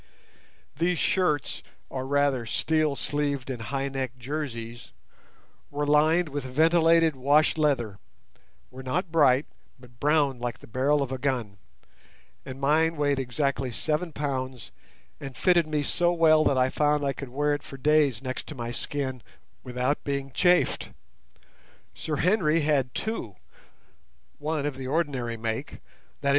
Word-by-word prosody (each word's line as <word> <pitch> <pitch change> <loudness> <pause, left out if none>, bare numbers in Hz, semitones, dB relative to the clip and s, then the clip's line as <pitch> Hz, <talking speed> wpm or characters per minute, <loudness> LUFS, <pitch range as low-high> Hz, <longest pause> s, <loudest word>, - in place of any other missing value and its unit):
These 175 +1 +1
shirts, 155 -3 +1 0.3
or 130 0 -5
rather 140 -4 +1
steel 155 +4 +1
sleeved 140 -3 -2
and 120 -3 -5
high 135 +4 -2
necked 130 -2 -4
jerseys, 120 -4 -5 0.8
were 145 +1 -2
lined 155 +4 +4
with 145 -1 -4
ventilated 165 +3 +4
wash 145 +4 +3
leather, 130 -10 0 0.7
were 130 - -9
not 160 +7 -2
bright, 145 -4 +4 0.3
but 120 -2 -18
browned 145 -4 +2
like 120 -1 -3
the - - -15
barrel 140 +5 +1
of 135 - -6
a 130 - -3
gun; 120 -7 -2 0.9
and 130 0 -7
mine 160 +4 +2
weighed 145 -2 +1
exactly 135 0 -1
seven 155 +8 -1
pounds 130 -4 -4 0.5
and 135 -2 -8
fitted 175 -3 +3
me 150 -1 0
so 175 +4 +1
well 160 -2 +5
that 135 - +3
I 130 0 +3
found 150 -1 +1
I 140 - 0
could 140 -2 -7
wear 145 +3 0
it 145 - -2
for 135 - -10
days 145 -4 +2
next 130 -1 -5
to 155 - -7
my 120 -2 -4
skin 130 0 -4 0.4
without 125 +3 -1
being 140 -1 -3
chafed. 180 +6 +2 1.0
Sir 155 - -3
Henry 165 -1 +2
had 140 -5 +1
two, 195 - -3 1.0
one 150 -1 -2
of 145 -3 -3
the 130 -1 -5
ordinary 135 -6 -1
make, 110 0 -4 0.5
viz. 140 - +2
140 Hz, 145 wpm, -27 LUFS, 130-155 Hz, 1.0 s, well